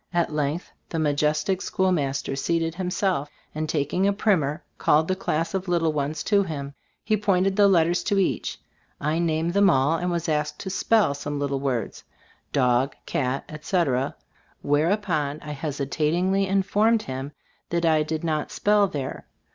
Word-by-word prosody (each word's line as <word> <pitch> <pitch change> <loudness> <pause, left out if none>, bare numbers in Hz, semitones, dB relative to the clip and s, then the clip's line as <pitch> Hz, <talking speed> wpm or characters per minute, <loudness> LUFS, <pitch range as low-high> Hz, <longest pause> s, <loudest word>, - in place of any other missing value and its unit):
At 170 -2 +1
length 150 +3 -2 0.2
the 165 - -3
majestic 150 +4 +1
schoolmaster 150 -8 0
seated 165 +3 0
himself, 180 -4 -1 0.2
and 155 0 -3
tak 145 -2 -1
ing 190 +2 +2
a 200 - +3
primer, 175 -7 +1 0.2
called 155 +2 +3
the 185 - +1
class 165 -3 -2
of 190 0 -2
little 165 -3 +1
ones 150 +1 -2
to 205 -2 +3
him. 145 -6 -4 0.3
He 215 - +2
pointed 195 -2 +1
the 205 0 +6
letters 175 -2 +3
to 200 -1 +1
each. 195 - 0 0.4
I 155 +3 0
named 165 0 0
them 200 0 +5
all, 145 +2 +3
and 180 - -1
was 170 -1 -2
asked 150 -1 -1
to 190 - -4
spell 210 -4 +2
some 145 +1 -4
little 140 -1 -1
words, 130 -4 -2 0.5
"dog," 125 0 +2
"cat," 130 0 -1
etc., 150 -4 -1 0.5
whereupon 155 -1 +1
I 150 - -6
hesitatingly 155 +6 0
informed 205 +4 +2
him 135 +2 -5 0.4
that 170 0 0
I 160 -2 +4
did 155 +1 -3
"not 155 -2 -1
spell 205 -1 +3
there." 140 -7 -5
160 Hz, 160 wpm, -25 LUFS, 145-185 Hz, 0.5 s, the